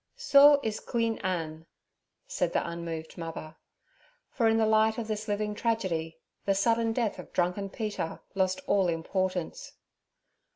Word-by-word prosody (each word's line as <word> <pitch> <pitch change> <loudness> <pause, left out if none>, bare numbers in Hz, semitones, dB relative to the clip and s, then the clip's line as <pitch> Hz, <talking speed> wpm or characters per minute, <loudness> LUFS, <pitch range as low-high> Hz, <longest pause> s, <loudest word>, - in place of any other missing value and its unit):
'So 290 - +7
iz 215 -1 -2
Queen 230 -1 -1
Ann' 165 -4 -3 0.6
said - - -1
the - - 0
unmoved 170 -1 -6
mother. 165 -1 -6 0.8
For 230 -3 +2
in 225 0 +3
the 225 - +3
light 220 0 +3
of 230 -2 -3
this 215 0 -3
living 210 0 -1
tragedy 185 -8 -1 0.3
the 195 - +1
sudden 230 +3 +2
death 225 -2 -1
of - - -10
drunken 180 +3 0
Peter 205 -6 -4
lost 185 -1 0
all 195 -2 +3
importance. 180 +1 -2
200 Hz, 140 wpm, -29 LUFS, 170-225 Hz, 0.8 s, So